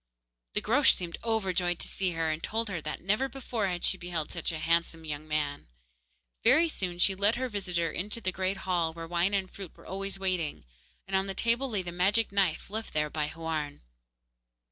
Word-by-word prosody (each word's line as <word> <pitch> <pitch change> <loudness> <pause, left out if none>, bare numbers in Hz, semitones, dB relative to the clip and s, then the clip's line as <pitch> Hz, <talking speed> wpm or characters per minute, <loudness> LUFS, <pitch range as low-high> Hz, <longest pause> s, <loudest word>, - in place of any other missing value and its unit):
The - - +3
Groac'h 265 +6 +5
seemed 175 -2 -4
overjoyed 190 -6 +1
to - - -6
see 185 -2 -1
her, 165 -1 0
and 155 +1 -3
told 225 +3 -1
her 175 -5 -3
that 155 0 -4
never 210 +9 +1
before 235 -5 -2
had 175 -2 -2
she 185 - +2
beheld 175 -3 -3
such 170 -1 -2
a 160 - -4
handsome 165 0 +1
young 150 0 -5
man. 150 -2 -1 0.8
Very 335 +1 +6
soon 185 - -3
she 195 +2 +5
led 200 +3 +4
her 255 +2 -1
visitor 180 -7 -1
into 205 +5 -2
the 185 -4 0
great 190 +2 -1
hall, 170 -3 +1
where 165 0 -7
wine 175 +4 +2
and 190 -1 -1
fruit 195 -4 -9
were - - -16
always 195 +1 -3
waiting, 185 -5 -1 0.4
and 190 - -2
on 190 +1 +2
the 195 - -3
table 235 +6 +2
lay 205 -5 -1
the 175 - -5
magic 200 +6 +3
knife, 195 -2 +1
left 220 +1 -4
there 150 -1 +1
by 150 -2 0
Houarn. 155 -2 -3
185 Hz, 205 wpm, -30 LUFS, 165-200 Hz, 0.8 s, Very